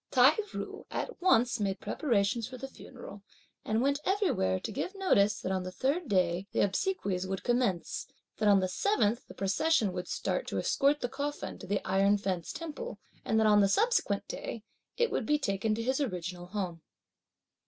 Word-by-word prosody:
Tai 260 +4 +6 0.2
ju - - -6
at - - -4
once 245 -10 +3
made 195 -2 -1
preparations 230 -4 0
for 255 - -8
the 270 - -6
funeral 245 -6 -11 0.4
and 220 +3 0
went 280 +1 +2
everywhere 355 - +1
to - - -5
give 330 +8 -4
notice 210 - +3
that 190 - -3
on 190 -1 0
the 185 0 -5
third 280 - -1
day 185 -1 +1
the - - +2
obsequies 195 - 0
would 190 0 -3
commence, 240 -9 0 0.3
that 215 -1 +3
on 200 -1 +6
the 185 - +1
seventh 240 - +1
the - - -12
procession 205 - +2
would 180 -1 -4
start - - -2
to - - -3
escort 285 +2 +2
the 245 - 0
coffin 290 +3 -4
to - - -9
the 200 +1 -1
Iron 195 +2 +4
Fence 185 -4 -3
Temple, 330 +9 -6 0.3
and 220 - +1
that 220 - +4
on 210 -1 +6
the 195 - +4
subsequent 465 - +2
day, 365 - -6 0.3
it 475 -1 +2
would 225 - -1
be 300 - +4
taken 215 -4 0
to 230 - -3
his 260 +4 0
original 180 -7 -4
home. 180 -4 -4
220 Hz, 185 wpm, -30 LUFS, 190-285 Hz, 0.4 s, Tai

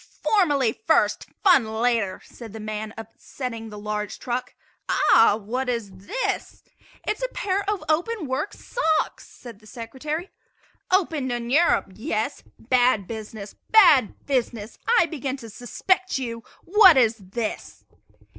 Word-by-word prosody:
"Formality 290 - +2
first, - - +2 0.2
fun 360 - +6
later," 220 -4 0
said 225 -4 -11
the 220 - -7
man, 215 0 -5
upsetting 225 +1 -7
the 210 - -9
largest 210 0 -4
trunk. 245 0 -4 0.3
"Aha! 225 -2 +5
what 240 +5 -3
is 230 -5 -2 0.2
this?" - - -3 0.4
"It 425 - 0
is - - -15
a - - 0
pair 400 -5 -1
of 415 -6 -2
open 340 +5 0
work 270 +9 -2
socks," 320 -10 -1
said 235 -5 -12
the 215 - -19
Secretary. 275 - -5 0.6
"Opened 320 -8 +1
in 240 0 -3
Europe 315 - +3
yes? 215 +2 -3 0.2
Bad 245 -4 +2
business! 215 -1 -8 0.2
bad 325 - +5
business! 240 -5 -2
I 475 -6 +5
begin 280 -4 -4
to 230 -4 -10
suspect 370 - -1
you. 230 -3 -5 0.2
What 380 -4 +7
is 230 -3 +4
this?" 215 +3 -6
245 Hz, 135 wpm, -24 LUFS, 220-315 Hz, 0.6 s, What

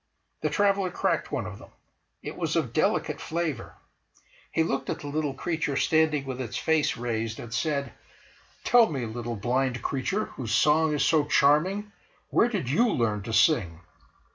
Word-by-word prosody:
The - - 0
traveller 200 -2 +2
cracked - - -1
one - - -2
of - - -8
them. - - -14 0.5
It - - -6
was - - -2
of - - -1
delicate - - 0
flavour. 160 -7 -3 0.8
He 165 - +2
looked 135 -4 -2
at - - -3
the 145 - -7
little 145 -1 -2
creature 160 -2 -2
standing 155 -3 +2
with 130 -1 -5
its 125 0 -4
face 155 0 +1
raised, 115 -2 -3
and 115 -1 -8
said: 140 +4 -1 0.7
"Tell 240 -2 +5
me, 130 -5 -2
little 120 +1 -5
blind 125 +3 -1
creature, 190 +11 -1
whose 115 -4 -3
song 150 0 +3
is 145 - +1
so 155 -3 +3
charming, 175 +9 +2 0.4
where 235 - +4
did 200 - -3
you 225 - +3
learn 110 - 0
to 115 - -6
sing?" 90 - +3
145 Hz, 165 wpm, -27 LUFS, 120-160 Hz, 0.8 s, Tell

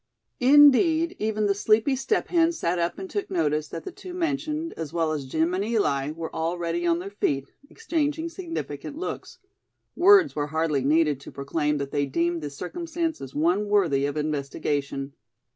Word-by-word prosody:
Indeed, 295 +6 +5
even 215 0 0
the 200 - +3
sleepy 220 +6 +2
Step 270 +11 -1
Hen 335 -1 +3
sat 180 - -1
up 170 0 -1
and 190 - -6
took 205 +1 -4
notice 155 -4 0
that - - -7
the 375 - -6
two 370 -1 -10
mentioned, 310 -1 -2
as 160 -3 -5
well 165 -2 0
as 145 -4 -3
Jim 160 +5 0
and 190 +2 0
Eli, 175 -11 0
were 160 +1 -6
already 170 +1 -2
on 170 0 +3
their 190 +3 -6
feet, 140 -8 -1 0.2
exchanging 320 -6 -2
significant 330 - -6
looks. 370 - -6 0.6
Words 370 -4 +6
were 145 -1 -1
hardly 155 -3 0
needed 150 0 +2
to 140 - -11
proclaim 150 +2 -1
that 140 -1 -4
they 145 -1 0
deemed 170 +4 0
the 145 - -4
circumstance 330 - -4
as 135 -1 -9
one 175 +7 +1
worthy 165 -10 +2
of 145 +1 -4
investigation. 145 -2 -2
175 Hz, 175 wpm, -25 LUFS, -, 0.6 s, Words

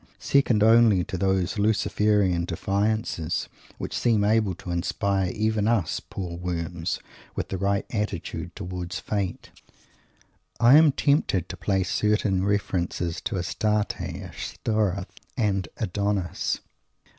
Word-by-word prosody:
Second 125 -6 +3
only 110 -4 +6
to 100 0 -5
those 95 +1 0
Luciferan 105 -4 +2
defiances, 100 -2 -1 0.3
which - - -5
seem 110 -4 +2
able 105 -3 +2
to 90 - -7
inspire 95 +2 0
even 110 +1 0
us 110 -8 +1
poor 90 -3 -6
worms 85 -1 -3 0.4
with - - -3
the 95 - -2
right 100 +1 +1
attitude 105 -1 -3
towards 90 0 -5
Fate, 100 -4 -3 1.1
I 120 +3 +7
am 155 -1 +7
tempted 135 - +1
to - - -5
place 95 0 0
certain 105 -3 +1
references 90 -4 -1
to 105 - -1
Astarte, 105 +4 0
Ashtoreth 100 -3 -3 0.2
and 100 -6 +1
Adonis. 100 -2 -1
100 Hz, 115 wpm, -26 LUFS, 90-110 Hz, 1.1 s, I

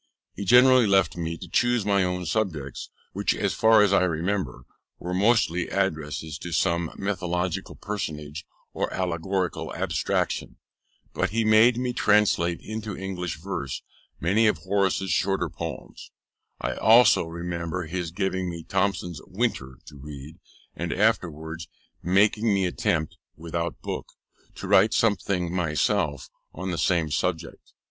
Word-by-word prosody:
He 100 - -6
generally 125 +2 +6
left 95 -2 +3
me 85 -1 -3
to - - -9
choose 120 -3 +1
my 100 -2 +3
own 90 0 -2
subjects, 80 - -2 0.2
which, - - 0
as - - -1
far 110 -1 +5
as 100 -1 +2
I 100 - +5
remember, 85 -6 -1 0.3
were 90 +1 -5
mostly 95 -3 +2
addresses 80 -5 -2
to 85 - -7
some 85 -1 +1
mythological 90 -1 -2
personage 75 -7 -5 0.3
or - - -2
allegorical 90 -1 -2
abstraction; 85 -6 -1 0.6
but - - 0
he 115 +2 0
made 110 +3 +5
me 125 0 -1
translate 100 -7 +2
into 110 -2 -6
English 90 -3 -4
verse 75 -7 -5 0.4
many 105 +7 +3
of 105 - +2
Horace's 95 -1 0
shorter 95 +1 +1
poems: - - -7 0.5
I - - -2
also 110 - +5
remember 85 +1 -4
his 85 +1 -4
giving 95 +1 -2
me 85 -1 -6
Thomson's 95 -5 -1
Winter 90 - -2
to 75 - -12
read, 75 +3 -10 0.4
and 85 0 -3
afterwards 80 -6 -1 0.3
making 105 +4 +3
me 100 -1 +2
attempt 80 -3 -1 0.2
(without 85 +1 -4
book) - - -4 0.5
to - - -7
write 105 +4 +5
something 95 -5 +1
myself 75 -4 0 0.2
on 95 +2 -4
the 85 - -3
same 85 -4 +1
subject. 80 +2 -3
90 Hz, 135 wpm, -25 LUFS, 80-100 Hz, 0.6 s, generally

